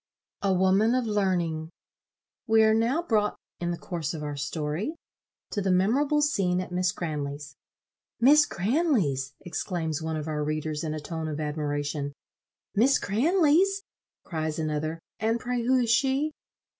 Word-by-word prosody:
A 200 - +2
Woman 190 +5 +3
of 255 -2 +1
Learning. 175 -7 0 0.8
We 220 0 +5
are 220 0 +5
now 235 +9 +2
brought, 215 -9 +1 0.2
in 175 - -2
the 175 - -2
course 165 -3 -4
of 150 - -5
our 145 -1 -3
story, 150 - -3 0.6
to 205 - -1
the 190 - 0
memorable 270 +11 +3
scene 185 -11 +1
at 185 - -5
Miss 180 0 +1
Cranley's. 145 -4 -5 0.6
"Miss 290 +5 +6
Cranley's!" 185 - 0
exclaims 165 -2 -3
one 160 0 -2
of 155 0 -4
our 150 -1 -1
readers, 155 0 -2
in 155 -1 -2
a - - -3
tone 160 +1 -4
of 155 -1 -4
admiration. 145 -1 -2 0.6
"Miss 250 +7 +4
Cranley's!" 340 - +3 0.4
cries 155 -2 -3
another, 155 0 -2 0.2
"and 225 +2 +1
pray 245 0 -2
who 255 +3 +3
is 240 -3 +2
she?" 270 +5 +2
180 Hz, 150 wpm, -27 LUFS, 155-235 Hz, 0.8 s, Miss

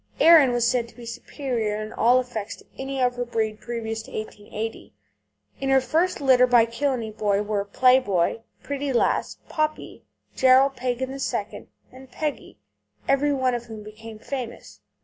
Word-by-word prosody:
Erin 320 -6 +7
was 240 -1 +1
said 240 -1 +1
to 235 - -18
be 240 -1 -11
superior 230 -2 -3
in 215 0 -6
all 245 +2 +4
respects 235 -4 -3
to - - -19
any 270 0 -4
of 250 -1 +1
her 245 - -1
breed 220 -2 -2
previous 225 -2 -4
to - - -14
1880. 215 - -6 0.6
In 270 - -2
her 270 0 +5
first 325 +7 0
litter 260 -3 +5
by 240 -2 +5
Killeney 235 -1 -2
Boy 205 -2 0
were 205 -1 -1
Play 255 +6 +4
Boy, 200 -2 0 0.2
Pretty 280 0 -3
Lass, 240 - 0
Poppy, 310 0 -3 0.3
Gerald, 265 +1 +5
Pagan 255 +1 -2
II., 275 0 -4 0.2
and 260 0 -14
Peggy, 300 +2 -4 0.5
every 275 +2 +2
one 260 -2 +1
of 240 -1 -3
whom 220 -2 -9
became 215 +1 -11
famous. 250 +1 -7
245 Hz, 165 wpm, -24 LUFS, 225-265 Hz, 0.6 s, Erin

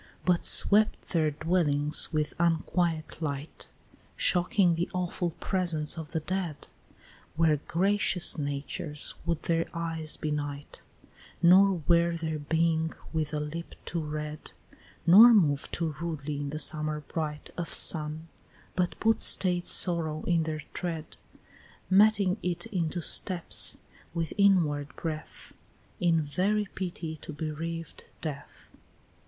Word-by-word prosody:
But 180 -1 +2
swept 210 +1 +3
their 160 -3 +2
dwellings 150 -1 +1
with 150 -2 -1
unquiet 170 -1 0
light, 145 -1 -5 0.5
Shocking 180 0 +3
the 170 +1 -2
awful 175 -2 -2
presence 170 -6 0
of 160 -3 -7
the 160 - -1
dead; 175 -2 -4 0.7
Where 160 -2 +3
gracious 190 0 +1
natures 145 +1 -2
would 170 -2 -1
their 165 0 0
eyes 165 -2 -3
benight, 145 -1 -5 0.6
Nor 185 0 +5
wear 170 0 +3
their 160 -2 -3
being 160 +1 0 0.2
with 155 -2 -1
a 150 - -2
lip 155 +3 -6
too 170 - -3
red, 150 0 -6 0.6
Nor 225 +7 +9
move 145 -8 +2
too 165 -3 -2
rudely 155 -3 -4
in 145 0 -4
the 155 - -4
summer 155 0 -1
bright 150 0 -5
Of 175 -1 -4
sun, 155 0 +1 0.5
but 180 -1 -1
put 225 0 +2
staid 180 -2 +1
sorrow 160 -4 +3
in 170 -2 +1
their 155 -1 -4
tread, 165 -3 -5 0.8
Meting 200 -1 +4
it 175 -1 -2
into 175 -3 -2
steps, 180 0 +2 0.4
with 165 -2 -2
inward 165 -8 +2
breath, 155 -2 -6 0.5
In 165 -3 +2
very 195 +8 0
pity 170 -4 -5
to - - -9
bereaved 160 +2 -5 0.2
death. 145 -3 -7
165 Hz, 125 wpm, -28 LUFS, 150-175 Hz, 0.8 s, Nor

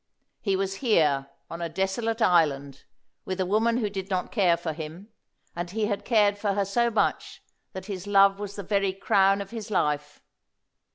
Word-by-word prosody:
He 195 -3 0
was 195 0 -2
here 150 - +2 0.2
on 170 - -7
a 170 - -2
desolate 220 +6 -1
island, 140 -5 +1 0.4
with 185 0 -4
a 185 - +1
woman 225 +5 +2
who 225 -4 0
did 195 -1 -6
not 185 -2 -2
care 180 -6 +3
for 165 -2 -4
him, 160 +6 -8 0.5
and 175 0 -4
he 215 +3 -1
had 205 -1 -3
cared 205 -3 +3
for 205 -1 0
her 200 0 0
so 235 +5 +1
much 225 - -1 0.3
that 190 0 -7
his 195 -1 -6
love 195 0 +5
was 205 -1 -6
the 200 - -6
very 195 0 0
crown 195 +1 +2
of 200 - -8
his 225 -3 -6
life. 150 -6 -1
195 Hz, 185 wpm, -26 LUFS, 175-205 Hz, 0.5 s, love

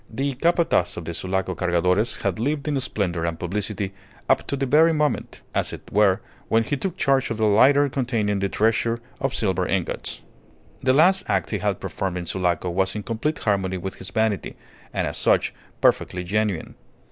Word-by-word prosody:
The 135 +4 -2
Capataz 165 - +2
of 85 - -5
the 85 - -4
Sulaco 95 +2 -1
Cargadores 90 +5 +1
had - - -1
lived 145 +4 -1
in 145 -2 +1
splendour 90 -9 -1
and 85 -1 -2
publicity 100 +1 -3 0.3
up - - +2
to - - -1
the 135 - 0
very 155 +5 +5
moment, 150 -1 -1
as - - 0
it - - -9
were, 100 -2 +3 0.3
when 115 0 +3
he 145 - -1
took 180 +5 -4
charge 135 -1 +2
of 115 - -3
the 110 - +2
lighter 135 +8 +5
containing 115 -7 -1
the 100 0 0
treasure 115 +2 +1 0.2
of 135 0 -1
silver 95 -6 0
ingots. 95 -4 -2 0.6
The 130 0 +3
last 185 +7 +5
act 95 -4 0
he - - -1
had - - -1
performed 95 -2 -3
in 90 - -4
Sulaco 90 -1 0
was 95 +2 0
in 105 - -4
complete 120 +9 -2
harmony 95 -3 0
with 95 +1 -5
his 95 - -6
vanity, 110 -3 -1 0.4
and - - -1
as - - -4
such - - +2 0.3
perfectly 90 0 +2
genuine. 100 -1 -1
105 Hz, 185 wpm, -23 LUFS, 95-135 Hz, 0.6 s, very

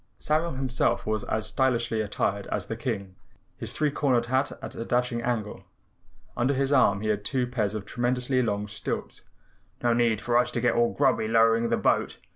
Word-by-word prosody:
Samuel 160 +2 0
himself 130 -1 0
was 110 -1 -1
as 110 0 -1
stylishly 120 -4 +1
attired 100 -1 -2
as - - -2
the 115 - -4
King, 105 -5 -4 0.5
his - - -3
three 150 -1 0
cornered 130 -5 +1
hat 130 +3 0
at - - -8
a - - -5
dashing 120 0 0
angle. 115 -3 -3 0.7
Under 125 +4 +1
his 135 +1 0
arm 100 -7 +4
he 110 - -2
had 105 -1 0
two 130 +1 0
pairs 110 -4 -2
of 105 -2 -5
tremendously 125 +3 0
long 105 -3 -1
stilts. - - -5 0.6
"No 120 -1 +3
need 115 -3 +2
for 120 +2 +2
us 125 - +1
to - - 0
get 120 0 +3
all 120 0 +2
grubby 130 -6 +2
lowering 115 +1 +3
the - - +2
boat. - - +1
120 Hz, 190 wpm, -27 LUFS, 110-130 Hz, 0.7 s, arm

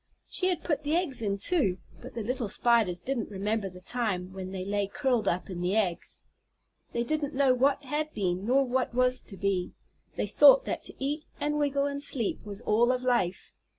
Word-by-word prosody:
She 370 - 0
had 355 -3 -1
put 300 -4 0
the 300 +2 0
eggs 325 -9 0
in, 200 -2 -1
too, 200 - +1 0.2
but - - -10
the 230 - -3
little 245 +1 -2
Spiders 220 -6 +2
didn't 255 -1 -3
remember 205 0 -2
the 180 0 -13
time 190 -5 -2
when 190 -1 -6
they 185 -1 -5
lay 200 0 0
curled 250 +1 0
up 180 - 0
in 180 -2 -6
the 180 +3 0
eggs. 190 -6 -1 0.7
They 235 - -1
didn't 300 +2 -2
know 270 -1 +4
what 275 +3 +2
had 300 +3 -2
been 185 -2 -1
nor 270 +2 +4
what 255 -1 -1
was 255 0 +3
to 195 - -7
be 195 -2 -1 0.4
they - - -1
thought - - +7
that - - -3
to - - -4
eat 295 +3 -3
and 295 0 0
wiggle 280 -1 +1
and 280 0 -2
sleep 240 -6 +1
was 205 0 -7
all 235 +2 +3
of 255 0 -2
life. 240 -8 0
240 Hz, 205 wpm, -28 LUFS, 195-280 Hz, 0.7 s, thought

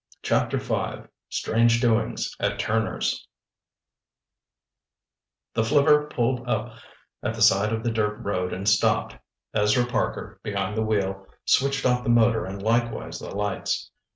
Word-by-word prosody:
Chapter - - +1
V - - -3 0.3
STRANGE 115 +1 +2
DOINGS 115 -2 0
AT - - 0
TURNER'S 110 +1 -1 2.3
The 115 - +1
flivver 150 +4 +4
pulled 125 0 -1
up 110 +1 -1 0.5
at - - -2
the - - -6
side 100 +3 +4
of 115 0 -2
the 120 - 0
dirt 105 -2 0
road 90 -2 -2
and 95 +2 -4
stopped. - - +2 0.4
Ezra 105 +4 +3
Parker, 120 - -3
behind 100 -1 -2
the 110 - 0
wheel, 95 -3 -1 0.2
switched 135 0 +2
off 125 -1 +3
the 125 - -3
motor 115 -1 +4
and 95 +1 -7
likewise 115 +2 0
the - - -8
lights. 105 0 -2
110 Hz, 135 wpm, -25 LUFS, 105-120 Hz, 2.3 s, flivver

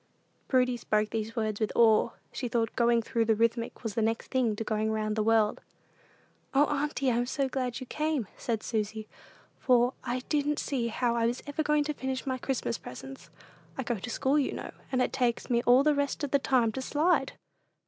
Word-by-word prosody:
Prudy 250 -2 +2
spoke 215 -2 0
these 225 0 -3
words 215 -3 -1
with 215 -2 0
awe. 225 -1 +5 0.2
She 250 - -3
thought 230 -2 -1
"going 235 -1 +3
through 230 +1 0
the 225 0 +3
Rithmetic" 230 +2 -1
was 220 -3 -4
next 225 0 0
thing 245 -5 +1
to 225 - -3
going 220 0 0
round 215 -1 -1
the 220 - +1
world. 220 -1 +2 0.9
"O 285 +2 +6
Auntie, 285 -2 0
I'm 240 +1 0
so 275 +1 0
glad 255 -2 -2
you 260 - -7
came," 300 -2 -1
said 225 -3 -3
Susy, 215 -1 -3 0.5
"for 250 0 +3
I 250 0 -2
didn't 295 -1 +1
see 250 -5 -1
how 235 +1 0
I 230 -1 +2
was 240 +2 -3
ever 290 +1 -2
going 300 -1 +2
to 300 +1 -2
finish 265 -2 -4
my 260 -1 -2
Christmas 245 - -2
presents: 135 +7 -10 0.5
I - - -2
go 235 -3 -2
to 240 - -6
school, 270 +5 +1
you 280 - 0
know, - - -6 0.2
and 255 -1 +2
it - - -2
takes 245 -2 0
me 235 0 +3
all 250 +3 +7
the 300 0 +4
rest 285 +1 -1
of 285 - -2
the 280 - +4
time 250 -4 +2
to 265 - -4
slide!" 300 0 +1
240 Hz, 205 wpm, -29 LUFS, 225-270 Hz, 0.9 s, all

